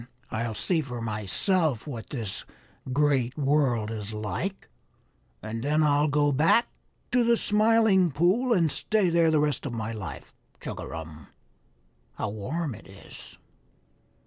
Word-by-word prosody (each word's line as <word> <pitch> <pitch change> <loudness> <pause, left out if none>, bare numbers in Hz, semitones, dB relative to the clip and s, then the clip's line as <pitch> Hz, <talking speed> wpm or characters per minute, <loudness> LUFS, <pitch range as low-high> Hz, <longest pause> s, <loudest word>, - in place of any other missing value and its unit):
I'll 115 0 -2
see 160 - 0
for 125 -5 -6
myself 115 - 0
what 120 -7 -7
this 115 -8 -4 0.5
Great 135 -2 +1
World 135 -7 +1
is 110 -1 -5
like, 165 - -4 0.8
and 110 +2 -4
then 150 +4 +2
I'll 145 0 +3
go 145 0 +2
back 160 - +4 0.4
to 245 -1 +4
the 235 0 +3
Smiling 210 -4 +3
Pool 185 - +2
and 170 -8 +3
stay 210 0 +1
there 165 -1 +4
the 155 -1 +3
rest 150 -3 0
of 125 - -5
my 115 -1 -3
life. 105 -5 -7 0.3
Chugarum, 80 -2 -7 0.9
how - - -3
warm 130 +9 -3
it 110 - -13
is!" 95 0 -13
145 Hz, 135 wpm, -27 LUFS, 110-170 Hz, 0.9 s, back